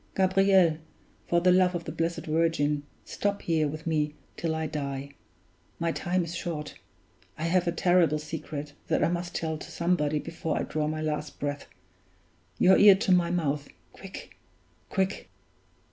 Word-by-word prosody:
Gabriel, 190 -3 +4 0.5
for 170 0 +2
the 180 +1 +5
love 180 0 +4
of 170 - -3
the 160 - -6
Blessed 165 +1 -2
Virgin, 155 -2 +1 0.2
stop 200 0 -2
here 160 -2 +1
with 155 +2 -6
me 150 -2 0 0.2
till 165 -1 -2
I 160 0 -2
die 140 -2 -4 0.7
my 165 0 0
time 180 +2 0
is 170 0 -6
short 165 -4 -4 0.6
I 155 - -5
have 175 +1 +2
a - - +3
terrible 175 -3 +3
secret 150 -1 -6
that - - +1
I - - +3
must 175 0 -3
tell 160 -1 -2
to - - -9
somebody 170 -4 +1
before 160 0 -3
I - - 0
draw 155 -1 -2
my 155 0 -2
last 150 -1 -3
breath! 145 0 -3 0.9
Your 190 - +6
ear 205 -1 +9
to 195 0 0
my 175 -2 +4
mouth 150 -5 -1 0.3
quick! 195 -1 -10 0.5
quick!" 190 0 -1
165 Hz, 160 wpm, -28 LUFS, 150-180 Hz, 0.9 s, ear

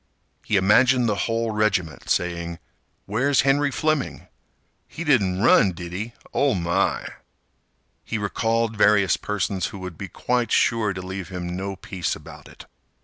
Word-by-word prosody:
He 110 - -1
imagined 125 +6 +4
the 105 - +2 0.2
whole 115 0 0
regiment 105 -6 -1
saying: 85 -1 -1 0.5
"Where's 130 +7 +2
Henry 140 +1 +2
Fleming? 155 0 -1 0.6
He 170 - -7
run, 100 - +4
didn't 85 0 -8
'e? 110 +5 -4 0.2
Oh, 140 -2 +2
my!" 85 +2 0 1.0
He 115 - -3
recalled 115 +3 0
various 105 -2 +4
persons 95 -3 -2
who - - -9
would 90 -3 -8
be 100 - -5
quite 120 +3 -1
sure 115 -3 +2
to 95 -1 -6
leave 95 -1 -6
him 90 -1 -5
no 95 +1 -4
peace 95 -2 -3
about - - -12
it. - - -14
105 Hz, 145 wpm, -23 LUFS, 90-115 Hz, 1.0 s, imagined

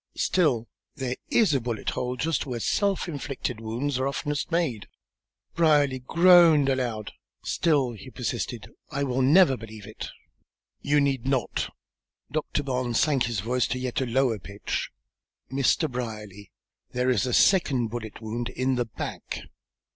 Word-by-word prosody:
"Still, 135 -11 +2 0.3
there 130 -3 -3
is 215 -9 +4
a 135 - +2
bullet 115 -2 -3
hole 125 0 -3
just 150 +2 -1
where 125 -3 -3
self 200 - 0
inflicted 135 -6 -4
wounds 125 +5 -2
are 130 - +1
oftenest 145 +1 -2
made." 150 - 0 0.7
Brierly 145 -5 +3
groaned 165 0 +6
aloud. 120 -5 -1 0.3
"Still," 145 -7 +1
he 110 +1 -10
persisted, 120 -4 -4 0.2
"I 140 -1 -2
will 130 -1 0
never 145 +2 +6
believe 110 -3 -10
it." - - -7 0.7
"You 145 +1 +3
need 135 -3 0
not." 135 -4 -1 0.6
Doctor 155 -1 -1
Barnes 125 -3 -1
sank 140 -5 +2
his 115 -4 -2
voice 125 +3 0
to - - -2
a - - -5
yet 130 0 -2
lower 125 -2 +1
pitch. 100 +3 -4 0.6
"Mr. 135 +4 +2
Brierly, 105 -6 -6 0.4
there 125 +1 +1
is 125 0 +1
a - - -1
second 135 - +3
bullet 110 -2 -7
wound 120 +2 -3
in 130 +1 0
the 120 - +1
back!" 110 - -6
130 Hz, 145 wpm, -26 LUFS, 120-145 Hz, 0.7 s, groaned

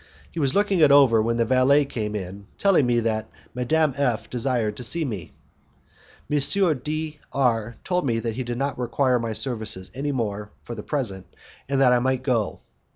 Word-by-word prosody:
He 170 - -5
was 140 -3 0
looking 200 -2 +2
it 150 -3 +6
over 135 -6 +6
when 115 +1 0
the 115 - +2
valet 130 +4 +4
came 105 -5 -4
in, 100 0 -7
telling 190 -10 +3
me 120 -1 +2
that 110 -1 -2 0.2
Madame 150 +4 +1
F 125 -6 -1
desired 120 -4 -1
to - - -4
see 165 +6 +1
me. 105 - -6 1.0
M. 150 0 +1 0.4
D 155 0 -4
R 115 -4 0
told 180 -5 -1
me 115 -2 +1
that 115 -1 -3
he 130 - -3
did 120 0 -4
not 135 0 -2
require 125 +1 +1
my 115 -1 -3
services 110 -6 -3
any 145 +3 -2
more 105 -5 -3
for 120 - -7
the 110 - -6
present, 105 -9 -3 0.4
and 140 -1 +1
that 125 -2 +5
I 125 - +4
might 130 +1 0
go. 120 -6 -1
125 Hz, 190 wpm, -24 LUFS, 115-140 Hz, 1.0 s, it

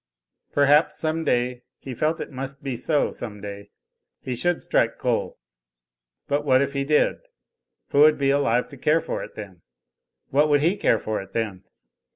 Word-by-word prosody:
Perhaps 145 +2 +4
some 160 +1 -1
day 125 -3 0 0.2
he 130 - -8
felt 155 +6 0
it - - -6
must 135 +1 -7
be 135 -3 -3
so 150 +4 +1
some 105 -3 -8
day 100 0 -8 0.5
he 130 - -5
should 175 +8 0
strike - - +1
coal. - - -1 0.9
But 145 +1 0
what 130 -3 +4
if 140 0 -1
he 140 0 -1
did? 150 +2 +2 0.7
Who 140 - +1
would 155 +1 +7
be 135 -1 +2
alive 125 -4 +1
to 140 - -12
care 150 +5 +2
for - - -4
it - - -11
then? 95 -5 -9 0.7
What 150 +3 +3
would 145 -1 +4
he 170 +6 +2
care 205 - +2
for 110 -2 -3
it 95 0 -13
then? 105 -5 -3
140 Hz, 180 wpm, -24 LUFS, 120-150 Hz, 0.9 s, would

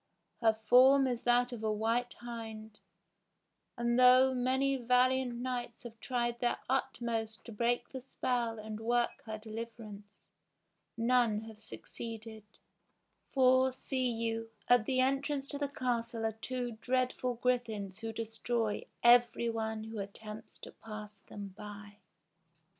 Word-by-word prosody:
Her 225 -2 +4
form 255 +5 +6
is 245 -2 -1
that 245 +1 +3
of 235 -3 -6
a 215 - +1
white 230 +3 0
hind; 220 -2 -8 1.0
and 240 +1 +1
though 255 +1 +7
many 260 +2 +1
valiant 250 0 +2
knights 245 -1 -4
have 230 -2 -10
tried 240 -2 -1
their 240 - +1
utmost 235 -4 -2
to 235 - -8
break 235 +3 0
the 260 - -7
spell 240 -3 -1
and 215 0 -6
work 240 +1 0
her 220 0 -4
deliverance, 215 -1 -8 0.9
none 230 -2 +3
have 220 -1 -11
succeeded; 220 0 -8 0.9
for, 260 0 +5
see 255 0 -1
you, 225 -1 -2 0.2
at 245 -3 +5
the 260 -1 +1
entrance 275 +1 0
to 285 - -3
the 285 -1 -1
castle 235 -4 -2
are 220 - +1
two 245 +2 -4
dreadful 255 0 0
griffins 225 -5 -1
who 225 0 -4
destroy 225 0 -2 0.2
every 240 0 +5
one 220 -1 -3
who 220 -1 -6
attempts 210 +2 -8
to - - -9
pass 210 -2 -9
them 200 0 -8
by." 205 0 -10
235 Hz, 135 wpm, -33 LUFS, 220-250 Hz, 1.0 s, though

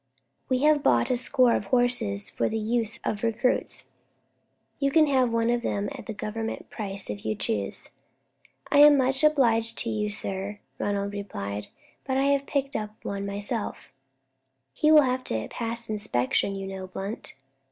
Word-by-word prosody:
"We 255 +1 +1
have 300 -1 +5
bought 120 - +3
a - - +3
score 255 -1 +3
of - - -2
horses 225 -3 +1
for - - -1
the 225 - -2
use 225 +1 -1
of 210 - -2
recruits. 235 +2 0 0.9
You 275 - +2
can 310 +2 +5
have 260 -4 +3
one 230 0 +2
of 240 0 +1
them 205 -3 -1
at 270 -3 -9
the 220 - -4
Government 220 +2 -5
price 200 -3 -4
if 100 -1 -7
you 110 0 -1
choose." 100 -2 -3 0.8
"I 285 - +5
am 295 0 +9
much 265 +2 +1
obliged 230 -7 +3
to 230 - -2
you, 210 -1 -1
sir," 200 0 -5 0.2
Ronald 200 0 -1
replied, 105 - -5 0.4
"but 265 -1 -1
I 280 +1 +4
picked 275 0 -2 0.3
one 200 0 -3
up - - -4
myself." 205 - -4 0.8
"He 305 - +3
will 305 -1 +8
have 255 0 0
to 110 -1 -2
pass 235 0 -4
inspection, 200 - 0
you 195 0 -5
know, 190 -1 -6
Blunt?" 195 +3 -6
225 Hz, 165 wpm, -26 LUFS, 200-260 Hz, 0.9 s, am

